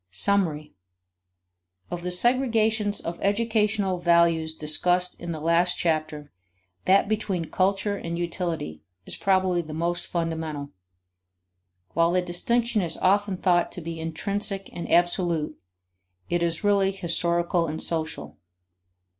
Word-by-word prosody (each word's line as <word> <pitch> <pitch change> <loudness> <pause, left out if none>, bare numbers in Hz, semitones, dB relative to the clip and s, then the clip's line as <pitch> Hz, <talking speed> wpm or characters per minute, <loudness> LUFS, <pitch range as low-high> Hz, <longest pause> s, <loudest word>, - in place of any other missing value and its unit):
Summary. 155 - +2 1.2
Of 175 - -4
the 180 - -3
segregations 220 0 +2
of 170 +1 -4
educational 205 -3 +1
values 170 -2 +3
discussed 180 +4 +1
in 170 0 -5
the 160 - -4
last 170 +3 +2
chapter, 155 -3 -1 0.5
that 195 +2 +4
between 200 -6 -2
culture 195 +2 +1
and 170 -2 -5
utility 170 - -3 0.2
is - - -4
probably 185 -2 +1
the 155 -2 -8
most 170 +2 -1
fundamental. 160 -4 -3 1.2
While 165 +1 +2
the 180 0 +2
distinction 225 +6 +1
is 165 -3 -3
often 200 0 +2
thought 175 -2 +2
to 180 - -6
be 165 0 -6
intrinsic 195 +4 -3
and 170 - -6
absolute, 175 -3 +2 0.8
it 175 0 +1
is 170 +2 0
really 200 -1 +3
historical 170 -1 0
and 155 +1 -4
social. 160 -1 -3
175 Hz, 120 wpm, -25 LUFS, 165-195 Hz, 1.2 s, that